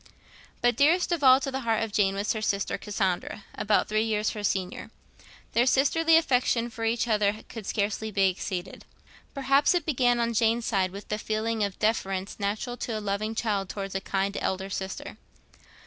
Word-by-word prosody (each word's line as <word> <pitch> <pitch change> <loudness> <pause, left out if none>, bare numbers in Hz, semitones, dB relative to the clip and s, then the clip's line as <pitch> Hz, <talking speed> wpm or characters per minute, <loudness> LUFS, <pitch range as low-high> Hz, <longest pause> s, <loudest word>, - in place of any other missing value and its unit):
But 245 -1 +3
dearest 340 +6 +3
of 335 -4 0
all 260 0 +8
to 270 - -3
the 265 - -2
heart 225 -3 0
of 225 - -4
Jane 195 -2 +2
was 200 +1 0
her 220 - -4
sister 200 -2 0
Cassandra, 195 -1 -2
about 210 0 +1
three 215 0 +1
years 215 -1 0
her 210 - -6
senior. 190 -2 -2 0.6
Their 240 +2 +2
sisterly 320 +5 +4
affection 245 -6 +1
for 225 0 -4
each 230 +1 0
other 210 -1 +1
could 220 -4 -8
scarcely 215 +1 -1
be 195 -2 +3
exceeded. 185 0 -4 0.5
Perhaps 275 +4 +3
it 345 -4 0
began 245 -5 +2
on 235 0 0
Jane's 230 +1 +2
side 190 -4 +1
with 200 +3 -10
the 210 - -2
feeling 220 0 -1
of 200 -2 -3
deference 195 -3 -1
natural 210 +5 -2
to 230 -3 -3
a - - -3
loving 210 +2 -2
child 205 -5 -1
towards 195 -1 -5
a 195 - -2
kind 195 +1 -1
elder 190 +1 -2
sister. 190 -1 -5
215 Hz, 185 wpm, -27 LUFS, 200-240 Hz, 0.6 s, all